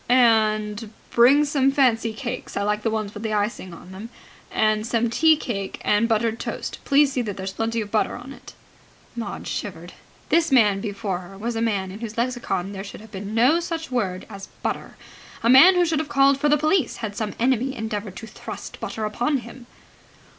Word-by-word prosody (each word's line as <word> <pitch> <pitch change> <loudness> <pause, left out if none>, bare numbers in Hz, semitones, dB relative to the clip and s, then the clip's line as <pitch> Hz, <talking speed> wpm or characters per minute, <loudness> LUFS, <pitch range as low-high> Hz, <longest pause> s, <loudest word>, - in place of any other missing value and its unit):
"And 215 -3 +3 0.2
bring 270 +5 +6
some 275 -2 +2
fancy 235 -5 +2
cakes 250 +2 -6
I 200 - 0
like 210 +1 0
the 225 - 0
ones 215 -2 -3
with 210 - -8
icing 210 -3 -2
on 175 +2 -12
them 200 +5 -8 0.4
and 215 -1 +2
some 235 0 0
tea 320 +5 +5
cake 200 -9 -4
and 210 +3 +3
buttered 225 0 +1
toast. - - -5
Please 280 0 +4
see 260 - -1
there's 195 -4 -4
plenty 225 +1 -1
of 205 -1 -7
butter 215 - +1
on 250 +3 -9
it." - - -14 0.6
Maud 235 -1 -5
shivered. - - -5 0.4
This 330 -2 +3
man 210 -6 +4
before 200 -3 -3
her 185 +2 -12
was 230 +3 -3
a 225 - -1
man 200 -5 -1
in 200 - -9
whose 225 -1 -7
lexicon 235 -6 -1
there 195 -1 -6
should 205 - -9
have 220 -1 -14
been 200 +2 -6
no 255 +9 +4
such 330 -4 -4
word 195 -7 -2
as 195 -2 -9 0.2
butter, - - -4 0.5
a 230 - +3
man 330 +9 +9
who 355 -1 +4
should 320 -2 0
have 310 -1 -3
called 275 0 +4
for 295 +1 +2
the 300 - +5
police 310 -1 +1
had 205 -2 -6
some 215 -1 -3
enemy 260 +2 +1
endeavoured 215 -4 -4
to 225 - -8
thrust 220 - -9
butter 220 - -4
upon 245 +7 0
him. 240 +1 -12
225 Hz, 195 wpm, -23 LUFS, 210-260 Hz, 0.6 s, man